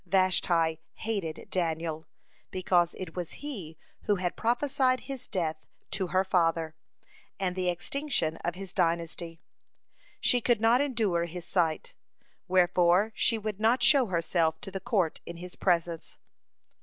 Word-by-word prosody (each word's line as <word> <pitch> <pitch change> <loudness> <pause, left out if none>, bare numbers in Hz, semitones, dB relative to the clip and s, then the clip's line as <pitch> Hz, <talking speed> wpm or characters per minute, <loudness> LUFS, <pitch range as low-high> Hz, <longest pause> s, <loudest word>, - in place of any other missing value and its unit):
Vashti 175 -4 +2 0.2
hated 200 -8 -4
Daniel, 160 -2 -2 0.4
because 180 -2 +1
it 180 -3 -7
was 175 -3 -4
he 195 - -7 0.3
who 205 - +3
had 180 -2 -2
prophesied 255 +2 +1
his 260 -1 -6
death 160 -4 -1 0.3
to 190 -2 -1
her 185 +2 +2
father, 165 -4 +1 0.7
and 185 -2 -1
the 185 -1 0
extinction 175 - -1
of 175 0 -3
his 190 -1 -7
dynasty. 165 0 -1 0.8
She 245 -2 +3
could 235 -1 +2
not 230 +4 +4
endure 215 -11 +1
his 170 +1 -7
sight, 165 -4 0 0.5
wherefore 180 +2 +4
she 230 +1 +2
would 215 -2 -4
not 230 +4 +3
show 275 -5 +6
herself 165 -2 +1
to 195 - -7
the 195 - -4
court 185 -4 0
in 170 - -7
his 180 +1 -9
presence. 170 -2 0
180 Hz, 140 wpm, -29 LUFS, 170-215 Hz, 0.8 s, show